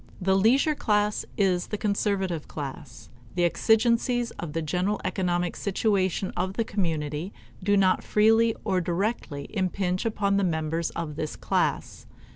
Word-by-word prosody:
The 190 0 +2
leisure 250 +10 +4
class 210 -6 0
is 185 -3 +2
the 210 - -3
conservative 200 -5 -1
class. 135 -3 -8 0.2
The 175 - +1
exigencies 235 +5 +2
of 165 -4 -5
the 165 - -1
general 180 +6 0
economic 180 -2 0
situation 195 -2 0
of 185 +2 -1
the 230 - 0
community 165 -4 -2 0.3
do 205 +2 +2
not 190 -1 +3
freely 225 +1 +4
or 190 -3 +1
directly 175 -5 -2
impinge 185 -2 -1
upon 200 -3 +1
the 200 - +2
members 160 -1 -1
of 155 -3 -4
this 155 -1 -3
class. - - -1
190 Hz, 140 wpm, -26 LUFS, 170-210 Hz, 0.3 s, leisure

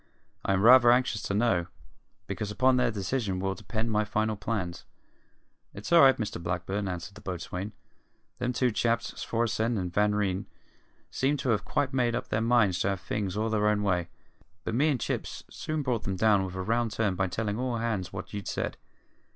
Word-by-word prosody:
I 95 - +1
am 95 +1 +1
rather 120 +1 +8
anxious 120 -4 +2
to 100 - -2
know, 95 -6 +2 0.6
because 105 -2 -4
upon 130 +4 +3
their 125 - +3
decision 105 -2 -2
will 95 +1 -1
depend 110 +3 -3
my 105 0 +2
final 110 +1 0
plans." 95 -5 -3 0.9
"It's - - -4
all 170 - +9
right, 135 -1 +7
Mr 105 -6 -4
Blackburn," 95 +4 -2
answered 90 +2 -5
the 105 - -13
boatswain. 95 +1 -5 0.7
"Them 125 0 0
two 125 0 +1
chaps, 115 +2 0
Svorenssen 115 0 0
and 90 -2 -3
Van 105 +1 +2
Ryn, 100 -2 -1 0.6
seemed 140 +3 +1
to 130 - -1
have 110 -3 +1
quite 135 -2 -1
made 120 -3 +1
up - - -4
their 110 - 0
minds 115 -6 +3
to 95 - +1
have 100 -2 -1
things 100 -2 -3
all 110 +1 0
their 105 -1 +2
own 105 -1 +1
way; 90 -4 0 0.5
but - - -3
me 140 +7 +3
and 135 -4 +1
Chips - - -3
soon 155 -1 -3
brought 125 -5 -1
'em 95 -1 -1
up 105 -3 +4
with 90 - -8
a 95 - -3
round 115 +3 +1
turn 105 -2 0
by 95 +1 0
tellin' 105 +4 -2
all 125 -2 -1
hands 105 -6 -2
what - - -7
you'd 100 -1 -5
said. - - -3
105 Hz, 200 wpm, -28 LUFS, 95-120 Hz, 0.9 s, all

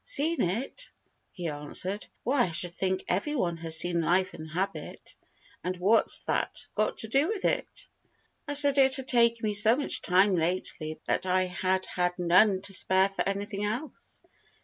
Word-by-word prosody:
"Seen 330 - +2
it?" 240 - -1 0.4
he 175 -2 -6
answered. 155 +7 -2 0.2
"Why, 255 +1 +2
I - - -4
should 175 +2 -1
think 190 +1 -2
every 250 +12 -1
one 170 - -1
has 165 -1 0
seen 175 0 +1
Life 185 +3 +1
and 160 0 -9
Habit: 190 +5 -5 0.5
but 180 0 -3
what's 200 +6 +3
that - - -1
got 215 0 -1
to 220 - -2
do 275 +7 +2
with 415 -1 -3
it?" - - -2 0.6
I 290 - -2
said 285 -1 +6
it 265 -1 +5
had 265 -1 -3
taken 235 -2 +2
me 210 - -1
so 215 +3 +6
much 285 - 0
time 190 +2 +3
lately 165 -2 -2
that 185 - -1
I 185 0 +2
had 185 +1 -1
had 180 0 -2
none 185 +3 +3
to 200 - -2
spare 190 +1 +3
for 195 - -5
anything 200 +1 -4
else. 230 +9 -5
195 Hz, 175 wpm, -28 LUFS, 180-235 Hz, 0.6 s, said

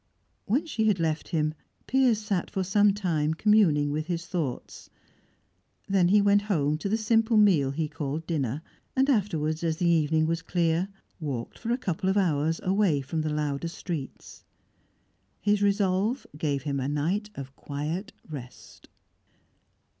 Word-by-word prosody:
When 260 - +1
she 230 -9 -1
had 200 -4 +2
left 160 -1 -1
him, 155 -3 0 0.3
Piers 255 -4 +3
sat 200 -4 -2
for 190 - -2
some 205 +2 +4
time 160 -6 0
communing 165 -8 +3
with 155 +2 -2
his 170 -1 -3
thoughts. 165 -8 -4 1.0
Then 195 -3 +3
he 205 +2 +5
went 205 0 +4
home 155 -8 0
to 200 - -3
the 220 - +2
simple 225 +1 +2
meal 180 -10 +5
he 155 +3 -2
called 150 0 -4
dinner, 145 -3 -2 0.3
and 270 +2 +3
afterwards, 165 - 0
as 160 -1 0
the 175 - 0
evening 160 -1 +3
was 165 +1 -1
clear, 170 +1 0 0.3
walked 135 -7 -5
for 230 - -5
a 240 - +2
couple 185 -6 -2
of 190 - +1
hours 160 -4 +1
away 185 -6 +2
from 155 +4 -3
the 155 - -1
louder 150 0 -2
streets. 165 -4 -7 1.0
His 205 0 +1
resolve 200 +4 +1
gave 145 -3 -1
him 140 -1 -2
a 130 - -2
night 175 +9 -1
of 135 -1 -8
quiet 155 +11 -4 0.2
rest. 135 -6 -10
170 Hz, 155 wpm, -27 LUFS, 150-205 Hz, 1.0 s, he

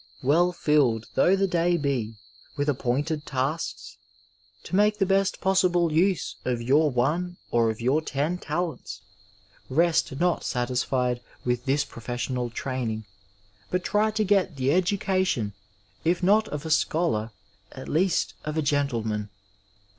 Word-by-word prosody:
Well 170 +7 +3
filled 145 -10 +2
though 180 +8 +4
the 195 0 +2
day 175 -1 +1
be 130 -7 -2 0.4
with 145 +1 0
appointed 145 +3 -1
tasks, 140 +1 -3 0.7
to - - -4
make 210 +1 +3
the 195 - +2
best 195 0 +1
possible 180 -3 +2
use 180 +2 +1
of 125 -2 -1
your 140 +6 +3
one 160 +8 0
or 115 -1 +3
of 110 - -4
your 130 +6 +2
ten 155 +4 -2
talents, 175 -3 -4 0.7
rest 155 -1 +1
not 175 0 +1
satisfied 125 0 -1 0.2
with 125 0 -1
this 140 +2 +1
professional 120 0 -4
training, 115 -3 -3 0.6
but 180 0 -1
try 210 +3 +2
to 215 0 0
get 195 -4 +2
the 135 0 +1
education, 185 - +1 0.5
if 175 +2 +1
not 215 +4 +4
of 150 +1 -5
a 160 - -3
scholar, 155 -8 +1 0.4
at - - -9
least 180 +4 +1
of 155 +1 -4
a 160 - +1
gentleman. 115 -8 -1
150 Hz, 140 wpm, -26 LUFS, 125-180 Hz, 0.7 s, though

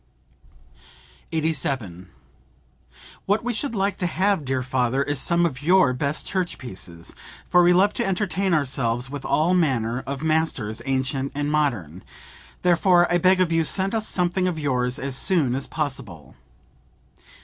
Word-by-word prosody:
87. 135 - -2 1.2
"What 205 +3 +1
we 245 0 -1
should 235 +2 -3
like 195 -1 0
to 180 - -1
have, 190 -3 0
dear 130 -1 -1
father, 130 +1 0
is 145 -2 -1
some 170 0 +3
of 135 -6 -3
your 170 -4 +4
best 140 +4 -2
church 185 -3 -2
pieces; 90 -8 -8 0.3
for 180 - +5
we 175 0 +5
love 190 +3 +4
to - - -1
entertain 195 0 -1
ourselves 130 -5 0
with 145 -1 -6
all 165 +4 +2
manner 125 -9 +1
of 140 +2 -4
masters, 155 -9 0
ancient 135 +1 -1
and 145 0 -1
modern. 110 - -1 0.6
Therefore 175 0 +4
I 175 - +3
beg 185 +2 +4
of 175 -2 +1
you 165 0 +2
send 190 +6 -1
us 220 -1 0
something 180 +1 0
of 175 -3 -2
yours 125 -4 -1
as 135 -1 -4
soon 150 -5 +1
as 135 +1 -3
possible." 130 - -5
150 Hz, 150 wpm, -23 LUFS, 130-180 Hz, 1.2 s, for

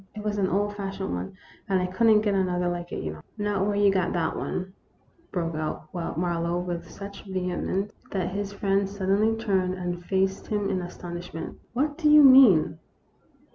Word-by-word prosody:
" - - -34
It 210 - -6
was 210 -1 -1
an 190 - +2
old 205 +2 0
fashioned 195 -1 -4
one, 90 - -5 0.3
and 190 -1 +3
I 180 - 0
could 185 +6 +1
n't 215 -1 +6
get 205 -2 +1
another 180 -2 +1
like 175 0 -3
it, - - -4
you 75 - -3
know." 80 - -12
" - - -39
Not 205 -2 0
where 205 - 0
you 205 -1 +4
got 190 -2 0
that 165 -2 0
one," 185 +1 -4 0.6
broke 165 -3 -2
out 155 0 -4
Mar 175 -1 -2
lowe, 170 +1 0
with 175 -1 -4
such 200 +2 -9
vehemence 190 +1 -2 0.2
that 185 -2 -2
his 200 +1 -3
friend 200 -1 0
suddenly 200 +3 +1
turned 190 -5 0
and 175 -1 -4
faced 190 +1 0
him 205 -2 -1
in 185 -1 -1
astonishment. 175 -1 -7
" - - -38
What 290 +4 0
do 305 -3 +3
you 300 0 +8
mean 240 - +7
190 Hz, 205 wpm, -26 LUFS, 175-205 Hz, 0.6 s, you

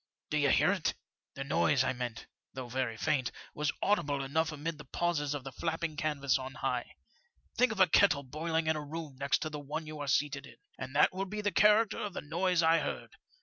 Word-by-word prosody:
* - - -62
Do - - +2
you - - +3
hear - - +4
it? - - 0
' - - -62
" - - -61
The 135 - -4
noise 140 -1 +2
I 130 - 0
meant, 125 -2 -5 0.3
though 130 -2 -6
very 120 -2 -2
faint, 135 -2 0 0.2
was 150 -1 0
audible 145 -9 +1
enough 160 +4 0
amid 155 +1 -4
the - - -8
pauses 150 -1 -1
of 140 - -5
the 135 - -7
flapping 165 +1 -2
canvas 140 -3 0
on 130 0 -7
high. - - -2 0.6
Think 250 -1 +4
of 215 - -5
a 185 - +8
kettle 160 -4 +4
boiling 160 +4 -2
in 160 0 +2
a 150 - -3
room 150 -1 -6
next 140 +1 +1
to 155 - -4
the 150 - -5
one 150 +3 -5
you 155 0 -7
are 145 - -4
seated 140 +1 +1
iq, - - -14 0.2
and 130 +1 -6
that 150 - +5
will 190 +1 -2
be 210 +2 -4
the 205 0 0
character 210 +1 +4
of 205 -2 -3
the - - -4
noise 175 +3 +1
I 165 +1 +5
heard. - - -5
150 Hz, 235 wpm, -32 LUFS, 140-165 Hz, 0.6 s, a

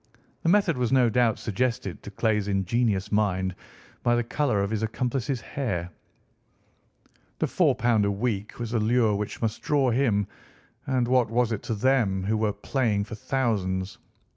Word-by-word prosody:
The 165 - +1
method 190 -5 +3
was 125 -2 0
no 125 -3 +4
doubt 120 -1 +2
suggested 115 -3 -2
to - - -8
Clay's 105 0 0
ingenious 100 +1 0
mind 95 -3 +1 0.5
by 120 0 +2
the 120 - +1
colour 120 -4 0
of 100 - -3
his 110 -1 -1
accomplice's 125 +2 -2
hair. 90 -11 -3 1.5
The - - +1
£ - - -2
4 - - +2 0.3
a 100 - +2
week 105 -1 -2
was 120 -1 -4
a 115 - +2
lure 110 0 +3
which 105 +3 -4
must 110 -1 -1
draw 140 -4 +2
him, 115 -5 +2 0.6
and 130 -3 +1
what 125 -1 +3
was 120 0 +1
it 110 - -2
to 115 - +1
them, 105 -5 +2
who 105 +3 0
were 110 -1 +1
playing 110 -3 0
for 110 +3 -9
thousands? 100 -6 -1
115 Hz, 165 wpm, -26 LUFS, 100-125 Hz, 1.5 s, no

